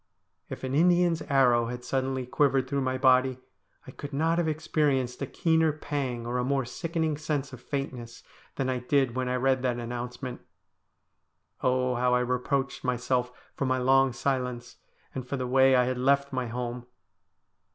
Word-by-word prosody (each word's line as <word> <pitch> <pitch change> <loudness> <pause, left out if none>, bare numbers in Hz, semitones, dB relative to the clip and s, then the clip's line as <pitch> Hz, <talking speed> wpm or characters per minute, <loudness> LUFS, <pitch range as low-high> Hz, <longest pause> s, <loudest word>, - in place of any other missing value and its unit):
If - - -7
an 130 0 -3
Indian's 175 +1 +3
arrow 125 -4 +4
had 125 +1 -6
suddenly 130 -1 -1
quivered 135 0 +2
through 140 +1 -1
my 130 0 -1
body, 130 -1 +3 0.5
I 130 - -9
could 145 +2 -8
not 165 +4 +1
have 170 - +1
experienced 150 -5 0
a 140 - -2
keener 160 +1 +2
pang, 140 -5 -4
or 120 +1 -1
a - - 0
more 135 0 0
sickening 160 +4 -2
sense 145 -2 -3
of - - -9
faintness, 125 -4 -5 0.3
than 135 - -1
I 130 -1 -1
did 130 0 +1
when 130 0 -1
I 125 - 0
read 130 0 +2
that 125 -2 0
announcement. 120 +1 -5 1.2
Oh, 125 0 +1
how 125 0 +2
I 125 - +2
reproached 125 +2 -1
myself 125 0 0 0.2
for 140 - -2
my 130 0 +1
long 135 +1 +4
silence, 125 -1 -3 0.4
and 130 -1 -5
for 140 - -3
the 130 - -2
way 130 +1 +5
I 125 - +5
had 125 0 -2
left 140 +1 +2
my 130 -1 -1
home 120 +1 -5
130 Hz, 170 wpm, -28 LUFS, 125-140 Hz, 1.2 s, way